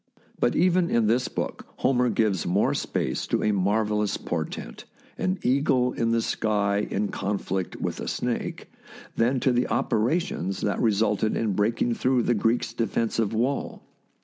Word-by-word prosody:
But 120 - +2
even 180 0 +3
in 115 -2 +2
this 120 +4 +2
book - - -4
Homer 125 -2 +2
gives 105 -8 +1
more 95 +4 +2
space 65 - -2
to - - 0
a 105 - +3
marvellous 105 +1 +1
portent, - - -5 0.3
an 185 +1 -1
eagle 130 -1 +2
in 115 - 0
the 115 0 +1
sky 105 -1 0
in 100 +1 -1
con 100 +1 -2
flict 95 -1 -3
with - - -4
a - - -5
snake, - - -3 0.4
than 125 +3 +2
to 130 - +3
the 125 +1 +1
operations 115 - 0
that 100 - -1
re 115 - +4
sulted 105 +1 +1
in 110 -3 0
breaking 115 +4 +1
through 125 +1 +1
the 120 - +2
Greeks' 115 +2 0
defensive 115 -1 0
wall. 125 +5 -1
115 Hz, 160 wpm, -26 LUFS, 105-125 Hz, 0.4 s, re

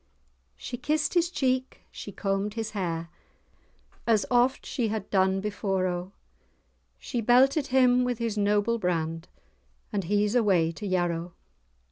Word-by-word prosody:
She 245 - -6
kissed 300 +3 0
his 345 -1 +2
cheek, 260 -5 -1
she 205 - -8
combed 195 +2 -2
his 225 -1 -3
hair, 170 -5 -3 1.0
As 220 -4 +3
oft 245 +2 +2
she 240 -4 -1
had 215 -2 -3
done 190 0 +2
before, 195 -2 -1
O, 180 +1 -3 0.9
She 240 -3 -3
belted 265 +5 +4
him 250 -1 +4
with 250 -1 -1
his 230 -2 -2
noble 210 +2 +1
brand, 165 -3 -2 0.7
"And 200 -3 -1
he's 205 +3 +1
away 190 -9 +3
to 205 +5 -7
Yarrow." 175 -2 -1
210 Hz, 135 wpm, -27 LUFS, 185-245 Hz, 1.0 s, belted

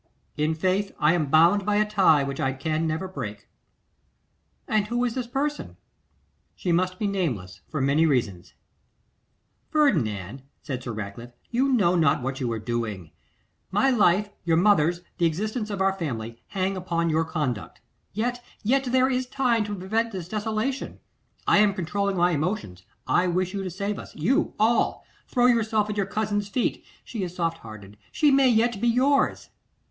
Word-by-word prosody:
'In 155 +1 0
faith; 190 +4 0
I 150 +2 +3
am 160 -4 0
bound 170 +7 +5
by 205 +1 +1
a 210 0 +3
tie 190 -9 +4
which 135 0 -4
I 135 0 0
can 155 +4 -1
never 160 +4 -2
break.' 110 - -7 1.2
'And 210 -1 +1
who 240 +2 0
is 240 - -1
this 250 -1 -3
person?' 290 +4 -3 0.8
'She 180 - -2
must 185 +2 +1
be 210 - -2
nameless, 125 - -2
for 155 - -2
many 145 +4 +3
reasons.' 105 - -1 1.1
'Ferdinand,' 130 - +1 0.2
said 130 -4 -4
Sir 125 - -5
Ratcliffe, 110 +3 -7 0.2
'you 260 +3 +2
know 190 -8 +3
not 155 -7 +2
what 130 0 -3
you 125 -3 -1
are 115 - -2
doing. 110 -7 -4 0.6
My 205 +8 +2
life, 210 -3 +3
your 165 -1 +2
mother's, 175 -3 +3 0.2
the 170 - +4
existence 215 +7 -3
of 200 -2 -3
our 195 0 +3
family, 115 -10 -5
hang 195 0 -1
upon 170 -2 -1
your 160 +1 +2
conduct. 150 -9 -3 0.3
Yet, 245 +3 -2 0.2
yet 265 +5 +2
there 255 +1 +3
is 255 -1 -1
time 245 -4 +1
to 205 0 -4
prevent 220 +5 -1
this 180 -3 -5
desolation. 220 +6 -3 0.5
I - - +5
am 205 -2 +4
controlling 200 +2 -1
my 175 +1 +3
emotions; 155 - -3 0.2
I 180 - +2
wish 180 +1 0
you 200 - -2
to 185 - -3
save 200 +4 -3
us, - - -11
you, 200 - +1
all! 225 +2 +2 0.2
Throw 245 -2 +2
yourself 220 -3 +2
at 210 - -5
your 195 -1 0
cousin's 205 -1 -1
feet. 245 +4 -1 0.2
She 225 - -6
is 180 -1 -4
soft 165 -2 -1
hearted; 105 -2 -11
she 295 -2 +3
may 270 -1 +5
yet 230 -2 +2
be 240 - +2
yours! 265 +4 +2
185 Hz, 175 wpm, -25 LUFS, 150-215 Hz, 1.2 s, bound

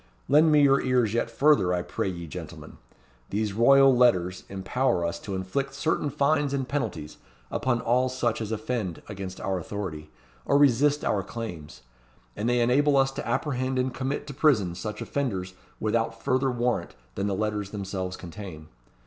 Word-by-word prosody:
Lend 155 +3 +5
me 150 -1 +5
your 135 -1 +5
ears 125 -4 +1
yet 115 0 0
further, 115 -7 +3
I 90 - -2
pray - - -3
ye, 85 -2 -6
gentlemen. 75 - -9 0.5
These 105 0 -1
Royal 135 +4 +6
Letters 95 -7 +3
empower 95 0 0
us 85 0 -3
to 100 - -5
inflict 135 +9 -3
certain 150 0 0
fines 145 0 +1
and 135 -2 -2
penalties 115 - -3 0.3
upon 120 -3 0
all 125 +3 +2
such 120 -3 -1
as 110 -1 -4
offend 110 -5 -3
against 95 -2 -7
our 95 -1 -2
authority, 85 -5 -6 0.3
or 140 - +3
resist 145 +1 +3
our 100 - +1
claims; 90 - -8 0.5
and 110 +3 -1
they 120 0 +2
enable 140 +4 +3
us 135 0 +3
to 135 - -6
apprehend 130 +1 -1
and 130 0 0
commit 135 +3 -3
to 145 - -7
prison 125 - +2
such 105 +4 -5
offenders 95 -10 -3 0.3
without 115 +1 -1
further 130 +1 +2
warrant 120 -7 -1 0.2
than 100 +1 -2
the 100 - -1
letters 105 -1 -2
themselves 95 -2 -4
contain. 85 -4 -9
115 Hz, 165 wpm, -26 LUFS, 95-135 Hz, 0.5 s, Royal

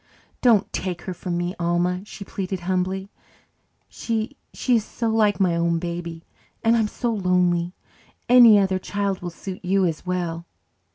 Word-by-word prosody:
"Don't 225 -5 +3
take 180 -2 -3
her 185 - -4
from 175 0 -4
me, 175 +1 -2
Alma," 175 +2 0
she 205 -1 -9
pleaded 190 -1 -4
humbly. 190 +2 -2 0.8
"She 225 +4 -3 0.2
she 250 -2 +2
is 220 - -1
so 230 +1 -3
like 215 -2 +2
my 180 -3 +3
own 170 0 +1
baby 170 -1 -5 0.4
and 225 0 +4
I'm 225 -2 +2
so 235 +2 -2
lonely. 180 -3 +1 0.5
Any 240 -4 +8
other 190 -2 +2
child 200 0 -2
will 175 - -4
suit 185 +3 -8
you 190 +1 +2
as 165 -3 -2
well." 175 -2 -3
185 Hz, 160 wpm, -23 LUFS, 175-205 Hz, 0.8 s, Any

